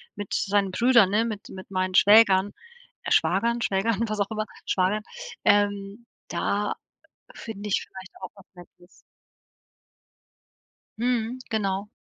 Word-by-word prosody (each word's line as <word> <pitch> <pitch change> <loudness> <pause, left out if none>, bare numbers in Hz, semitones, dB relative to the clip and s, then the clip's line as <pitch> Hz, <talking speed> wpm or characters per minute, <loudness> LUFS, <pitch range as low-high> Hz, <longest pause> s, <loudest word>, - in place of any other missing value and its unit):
mit 205 - -6
seinen 200 -1 +1
Brüdern, 235 -2 +4
ne, 220 +3 +2
mit 215 -2 -6
mit 185 0 -10
meinen 185 -1 -2
Schwägern 205 -1 +5 0.5
äh, - - -5
Schwagern, 235 +1 +2
Schwägern, 205 +2 0
was 215 0 -4
auch 200 +1 -1
immer, 215 0 -2 0.2
Schwager 190 +3 0 0.4
ähm, 205 +2 +1 0.2
da 205 +1 -1 0.6
finde 210 -2 -7
ich 195 - 0
vielleicht 190 -1 -12
auch 185 - -6
was 195 - -17
Nettes. 175 0 -18 2.0
Mhm, 240 0 -1
genau. 200 -2 -2
205 Hz, 125 wpm, -25 LUFS, 190-220 Hz, 2.0 s, Schwägern